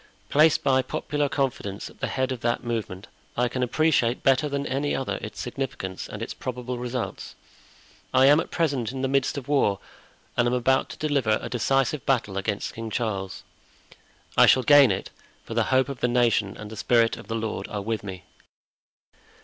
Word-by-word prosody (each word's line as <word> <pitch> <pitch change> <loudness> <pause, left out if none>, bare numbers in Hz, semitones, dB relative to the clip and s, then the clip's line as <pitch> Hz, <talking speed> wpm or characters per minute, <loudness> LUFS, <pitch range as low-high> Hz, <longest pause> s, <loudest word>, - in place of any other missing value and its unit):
Placed 155 +1 +4
by 130 -1 +3
popular 145 +2 -2
confidence 120 -9 -2
at - - -15
the - - -1
head 130 0 -1
of 130 - -3
that 120 +1 -1
movement, 110 -5 -4 0.3
I 125 +1 +3
can 130 +1 -3
appreciate 125 -2 +2
better 135 +2 +3
than 140 0 -2
any 140 +2 -1
other 135 - -2
its 105 - -7
significance 120 -7 -5
and - - -6
its - - -5
probable 125 0 -5
results. 125 0 -4 0.8
I 130 0 +5
am 145 +3 +7
at - - -3
present 140 -9 0
in 135 0 -5
the - - +2
midst 135 +1 +1
of 135 - -6
war, 135 -9 +2 0.6
and 120 - +2
am 125 - +1
about 130 +2 +2
to - - -9
deliver 140 -8 +1
a - - -6
decisive 135 +2 +1
battle 120 -7 0
against 100 +1 -3
King 115 0 -6
Charles. 105 -4 -3 0.9
I - - +7
shall 130 - +5
gain 145 -2 +7
it, 95 -1 -3 0.3
for - - -6
the - - +2
hope 130 0 +2
of 140 -3 -6
the - - +1
nation 120 -5 +1
and 105 0 -9
the 110 - -8
Spirit 115 -1 +3
of - - -12
the 115 - -3
Lord 110 -1 -3
are 105 -1 -4
with 110 0 -2
me. 95 -4 -7
125 Hz, 190 wpm, -25 LUFS, 115-135 Hz, 0.9 s, am